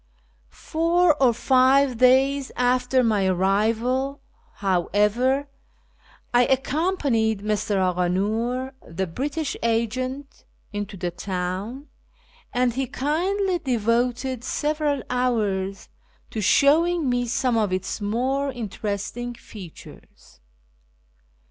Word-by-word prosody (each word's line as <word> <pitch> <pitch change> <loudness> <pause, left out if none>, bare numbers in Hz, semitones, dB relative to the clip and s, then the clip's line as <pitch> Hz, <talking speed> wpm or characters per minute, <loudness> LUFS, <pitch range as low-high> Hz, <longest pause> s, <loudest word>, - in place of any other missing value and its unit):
Four 335 +1 +2
or 255 -3 +6
five 260 +1 +3
days 265 +2 +4
after 250 +1 +2
my 210 -4 +2
arrival, 225 +9 +1 0.4
however, 210 +8 +1 0.9
I 245 0 +5
accompanied 265 - +1
Mr. 210 -1 -1
Aghanor, 200 +8 0
the 190 +4 -4
British 280 - -3
agent, 255 +5 -2 0.3
into 205 -1 -5
the 175 -1 -3
town, 185 +8 -4 0.7
and 250 -1 +1
he 265 +2 -2
kindly 360 - 0
devoted 245 -1 0
several 295 0 -1
hours 205 -6 -1 0.4
to 220 - -3
showing 310 - +3
me 245 -1 0
some 250 0 0
of 215 -4 +1
its 185 +3 -3
more 260 +7 0
interestino 225 +1 -4
features. 180 - -13
245 Hz, 90 wpm, -24 LUFS, 205-270 Hz, 0.9 s, or